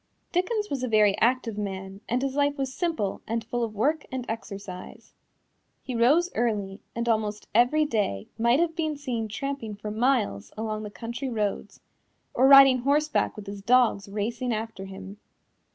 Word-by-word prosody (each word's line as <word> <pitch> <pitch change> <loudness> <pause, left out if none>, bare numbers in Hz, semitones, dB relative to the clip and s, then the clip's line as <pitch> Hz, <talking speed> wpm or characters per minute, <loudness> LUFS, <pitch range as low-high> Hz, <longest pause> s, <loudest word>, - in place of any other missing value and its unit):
Dickens 415 +4 0
was 275 -3 -2
a 255 - -1
very 210 -3 +4
active 235 -3 +1
man, 195 -1 -5
and 250 +3 0
his 270 -1 -1
life 285 +1 +1
was 265 -1 -2
simple 320 - -2
and 230 0 -1
full 240 +1 -2
of 220 -2 -4
work 295 +8 +1
and 255 -2 -4
exercise. 200 -4 -7 0.7
He 260 - -5
rose 290 +10 +3
early 210 -4 -1
and 235 0 -2
almost 215 -2 -1
every 245 +7 +4
day 205 - -1
might 235 +4 +3
have 335 -1 +1
been 310 -3 -1
seen 245 -6 -3
tramping 235 -1 -4
for 210 +1 -6
miles 215 - 0
along 215 -1 -3
the 210 - -6
country 235 +5 -5
roads, 210 -4 -3 0.5
or 260 +2 +4
riding 275 -2 +9
horseback 290 +4 +1
with 210 - -9
his 200 0 -7
dogs 230 -3 +3
racing 230 +5 -2
after 220 -3 -4
him. 195 +1 -9
230 Hz, 170 wpm, -26 LUFS, 210-270 Hz, 0.7 s, riding